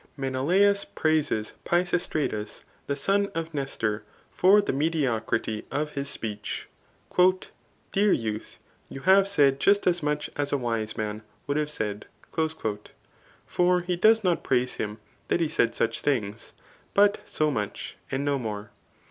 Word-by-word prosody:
Menelaus 175 +10 +2
praises 155 -9 0
Pisistratus, 170 - -1 0.2
the 140 - 0
son 200 +8 +1
of 165 0 -3
Nestor, 115 -7 -2 0.3
for 195 +3 +5
the 205 - 0
mediocrity 125 -7 0
of 150 +2 -2
his 140 -1 -4
speech.] 105 -2 -5 0.6
" 185 0 -3
Dear 200 +1 +3
youth, 110 -5 -2 0.3
you 135 - -8
have 195 +3 +5
said 140 -8 +3
just 200 +6 +3
as 175 -1 +2
much 150 0 -1
as 145 -1 -1
a 145 - +2
wise 115 -4 -2
man 105 0 -3 0.2
would 145 0 -1
have 150 -1 0
said. 105 -7 -4 1.4
For 180 0 +2
he 180 0 -1
does 220 +5 +5
not 180 -3 +1
praise 125 -1 +1
him 105 0 -4 0.3
that - - +1
he 165 - +2
said 120 -7 +1
suck 115 - +1
things, 115 -7 -2 0.4
but 205 0 +4
$0 155 -1 +1
trnich 105 -4 -3 0.2
and 135 +2 -1
no 140 -1 +1
more. 105 -3 -5
145 Hz, 145 wpm, -26 LUFS, 115-175 Hz, 1.4 s, for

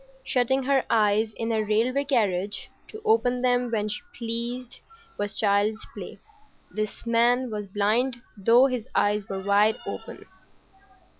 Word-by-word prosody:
Shutting 260 +1 +1
her 270 0 +2
eyes 215 0 +3
in 230 0 -2
a 220 -1 +1
railway 230 +6 +1
carriage 205 -7 0 0.2
to 435 0 -11
open 250 - +2
them 245 -1 +2
when 215 -2 -1
she 210 - -3 0.2
pleased 235 +2 -3 0.4
was 205 -1 -1
child's 205 +1 +1
play. - - -8 0.5
This 215 +1 -4
man 240 +2 +2
was 210 -1 -4
blind 215 +6 +1 0.2
though 230 +6 +5
his 250 -3 -2
eyes 205 -1 +1
were 190 -1 -4
wide 205 +2 +4
open. - - -7
230 Hz, 140 wpm, -26 LUFS, 210-250 Hz, 0.5 s, though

